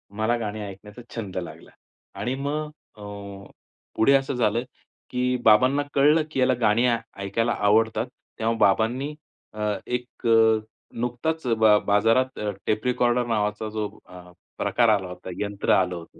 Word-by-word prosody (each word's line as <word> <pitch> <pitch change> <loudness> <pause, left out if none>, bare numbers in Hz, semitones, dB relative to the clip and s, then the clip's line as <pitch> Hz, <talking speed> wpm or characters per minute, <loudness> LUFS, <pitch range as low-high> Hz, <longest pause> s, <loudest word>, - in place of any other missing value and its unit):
मला 110 +2 +1
गाणी 110 -1 -4
ऐकण्याचा 105 +4 -11
छंद 100 -5 -5
लागला 85 - -7 0.5
आणि 125 +2 -2
मग 145 +3 -3 0.3
अ, - - -13 0.9
पुढे 135 +5 +4
असं 135 0 +2
झालं, 115 0 +1 0.5
की 125 0 0
बाबांना 130 +6 +5
कळलं, 150 +3 +4
की 135 - -2
याला 130 0 +4
गाणी 110 +2 +3
ऐ 120 - +2 0.3
ऐकायला 115 +4 0
आवडतात. 110 +2 +2 0.3
तेव्हा 115 +1 +1
बाबांनी 125 +9 +2 0.4
अ, 105 - -10 0.3
एक 125 -1 -4
अ, 110 -1 +5 0.4
नुकताच 125 +6 -2
अ, 115 - +3
बा 110 -1 +5
बाजारात 115 +6 +2
अ, 105 -1 -2 0.2
टेप 110 +3 -1
रिकॉर्डर 125 -1 +2
नावाचा 105 -1 -1
जो 105 -1 -3 0.2
अ, 90 -1 -13 0.3
प्रकार 120 -2 +2
आला 100 -3 +2
होता, 90 +1 -9
यंत्र 100 -1 -1
आलं 90 -1 +2
होतं. 85 -1 -11
115 Hz, 150 wpm, -24 LUFS, 105-125 Hz, 0.9 s, बाबांना